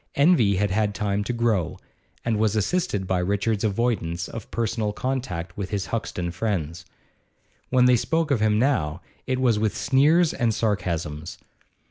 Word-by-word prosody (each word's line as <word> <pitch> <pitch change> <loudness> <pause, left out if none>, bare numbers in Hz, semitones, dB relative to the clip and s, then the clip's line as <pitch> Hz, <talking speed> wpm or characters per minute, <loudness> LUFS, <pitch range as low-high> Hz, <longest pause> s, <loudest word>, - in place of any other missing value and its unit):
Envy 140 - +4
had 100 +1 0
had 105 0 0
time 105 -1 -1
to 110 - -2
grow, 115 -7 0 0.5
and 115 -2 +1
was 110 -1 +2
assisted 110 - 0
by 95 0 0
Richard's 100 +3 0
avoidance 100 -6 -1
of 115 -3 -8
personal 115 -2 -1
contact 95 -10 -3
with 100 -2 -4
his 100 -2 -2
Hoxton 90 -6 -3
friends. 90 -4 -3 0.8
When 125 -1 +4
they 125 0 +6
spoke 160 +6 0
of 135 - +3
him 105 -1 +3
now 95 - +1 0.3
it 130 0 0
was 120 -5 +2
with 105 -1 0
sneers 150 +6 +3
and 115 -4 0
sarcasms. 85 -7 -2
105 Hz, 155 wpm, -24 LUFS, 95-125 Hz, 0.8 s, they